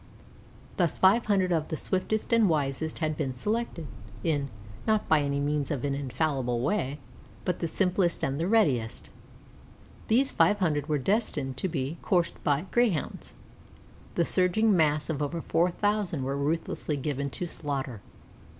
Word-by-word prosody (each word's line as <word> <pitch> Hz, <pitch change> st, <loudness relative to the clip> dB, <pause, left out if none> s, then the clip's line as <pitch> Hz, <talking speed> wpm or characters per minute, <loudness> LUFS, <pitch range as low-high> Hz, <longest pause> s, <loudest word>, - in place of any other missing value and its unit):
Thus 175 Hz, -5 st, +1 dB
five 205 Hz, +5 st, +4 dB
hundred 190 Hz, -3 st, +2 dB
of 160 Hz, -3 st, +1 dB
the 160 Hz, -, -3 dB
swiftest 210 Hz, -, -1 dB
and 225 Hz, -4 st, +5 dB
wisest 150 Hz, 0 st, -1 dB
had 155 Hz, -2 st, -1 dB
been 135 Hz, -4 st, -2 dB
selected, 210 Hz, -, -2 dB, 0.4 s
in, 145 Hz, -4 st, 0 dB, 0.4 s
not 215 Hz, -1 st, +2 dB
by 155 Hz, -1 st, +4 dB
any 140 Hz, 0 st, -1 dB
means 145 Hz, 0 st, 0 dB
an 140 Hz, -6 st, -2 dB
infallible 135 Hz, -2 st, -1 dB
way, 145 Hz, -2 st, 0 dB, 0.5 s
but 180 Hz, -, -1 dB
the 170 Hz, -, -1 dB
simplest 180 Hz, 0 st, +1 dB
and 135 Hz, +3 st, -1 dB
readiest. 140 Hz, -, +1 dB, 1.0 s
These 260 Hz, +5 st, +3 dB
five 210 Hz, -, +4 dB
hundred 150 Hz, -6 st, 0 dB
were 150 Hz, -, +2 dB
destined 145 Hz, -, -1 dB
to 190 Hz, -, -1 dB
be 155 Hz, -1 st, -3 dB
coursed 175 Hz, -3 st, 0 dB
by 145 Hz, +3 st, +1 dB
Greyhounds. 230 Hz, -10 st, 0 dB, 0.8 s
The 170 Hz, -, +2 dB
surging 190 Hz, +5 st, +3 dB
mass 150 Hz, -3 st, +2 dB
of 150 Hz, -3 st, -2 dB
over 145 Hz, +3 st, -2 dB
four 165 Hz, +2 st, +2 dB
thousand 205 Hz, -6 st, 0 dB
were 135 Hz, +1 st, -1 dB
ruthlessly 150 Hz, +1 st, -1 dB
given 140 Hz, 0 st, -2 dB
to 175 Hz, -, -4 dB
slaughter. 140 Hz, -8 st, -4 dB
160 Hz, 150 wpm, -28 LUFS, 140-190 Hz, 1.0 s, and